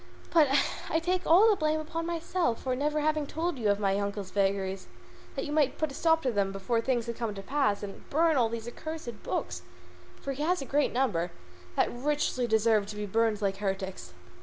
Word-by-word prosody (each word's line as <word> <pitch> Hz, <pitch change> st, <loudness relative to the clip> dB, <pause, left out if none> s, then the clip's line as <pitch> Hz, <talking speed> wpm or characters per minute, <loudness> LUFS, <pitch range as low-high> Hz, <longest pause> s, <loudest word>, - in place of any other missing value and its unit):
But 320 Hz, -3 st, +6 dB, 0.4 s
I 320 Hz, -, +2 dB
take 360 Hz, +2 st, 0 dB
all 365 Hz, +7 st, +7 dB
the 430 Hz, -, +5 dB
blame 310 Hz, -3 st, +1 dB
upon 330 Hz, +2 st, -4 dB
myself 340 Hz, -6 st, -1 dB
for 255 Hz, -1 st, 0 dB
never 300 Hz, +3 st, 0 dB
having 305 Hz, -1 st, +1 dB
told 325 Hz, -2 st, -2 dB
your 225 Hz, -, -4 dB
worships 200 Hz, -1 st, +4 dB
of -, -, -9 dB
my 195 Hz, 0 st, +2 dB
uncle's 200 Hz, -1 st, -3 dB
vagaries, 195 Hz, -1 st, 0 dB, 0.5 s
that 270 Hz, -, -2 dB
you 290 Hz, -, -5 dB
might 295 Hz, -3 st, +2 dB
put 310 Hz, -2 st, -1 dB
a -, -, -8 dB
stop 325 Hz, +2 st, +2 dB
to 255 Hz, -, +1 dB
them 200 Hz, -3 st, 0 dB
before 195 Hz, +4 st, -1 dB
things 240 Hz, -1 st, 0 dB
had 235 Hz, -1 st, -4 dB
come 230 Hz, -1 st, -2 dB
to 195 Hz, -, -6 dB
this -, -, -22 dB
pass, 270 Hz, -9 st, +1 dB
and 200 Hz, -1 st, -8 dB
burn 320 Hz, +2 st, +3 dB
all 240 Hz, -4 st, +3 dB
these 230 Hz, 0 st, -5 dB
accursed 245 Hz, -2 st, -6 dB
books -, -, -3 dB, 0.6 s
for 275 Hz, -, -4 dB
he 275 Hz, -, -6 dB
has 355 Hz, +4 st, +2 dB
a 275 Hz, -, -5 dB
great 290 Hz, +2 st, +1 dB
number 205 Hz, -10 st, 0 dB, 0.5 s
that -, -, +2 dB
richly 260 Hz, -1 st, 0 dB
deserve 220 Hz, -2 st, +3 dB
to 210 Hz, -, -7 dB
be 210 Hz, 0 st, -3 dB
burned 220 Hz, +1 st, +1 dB
like 195 Hz, -1 st, 0 dB
heretics." 190 Hz, -, -3 dB
245 Hz, 220 wpm, -29 LUFS, 205-310 Hz, 0.6 s, all